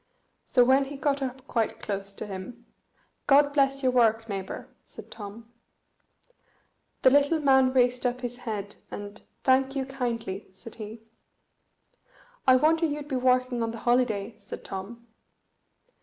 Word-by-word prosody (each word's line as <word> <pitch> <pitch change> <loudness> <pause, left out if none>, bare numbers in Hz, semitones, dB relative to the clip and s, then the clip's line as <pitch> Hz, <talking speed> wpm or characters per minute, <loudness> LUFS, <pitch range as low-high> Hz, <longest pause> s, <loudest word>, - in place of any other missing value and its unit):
So 250 - +4
when 265 +2 +4
he 285 +1 -7
got 280 0 0
up 260 0 -4
quite 230 -5 -1
close 200 -1 -4
to - - -6
him, 210 +5 -8 0.6
"God 285 +1 +5
bless 275 -1 +2
your 255 - +3
work, 225 -2 +3
neighbour," 195 -3 -5 0.2
said - - -12
Tom. 225 +2 -10 1.5
The 260 - +7
little 285 +3 +4
man 265 -3 +4
raised 250 -1 +2
up 245 +1 -3
his 245 -1 -4
head, 215 -5 -5
and 205 +1 -8 0.2
"Thank 265 +1 +3
you 270 -1 -1
kindly," 235 -7 -4
said 225 +4 -12
he. 215 +1 -8 1.4
"I 260 - +8
wonder 320 +5 +3
you'd 295 0 -5
be 270 - -1
working 255 -1 +2
on 230 - 0
the 230 - -6
holiday!" 235 -4 +1
said - - -9
Tom. 215 +5 -7
250 Hz, 145 wpm, -27 LUFS, 225-270 Hz, 1.5 s, I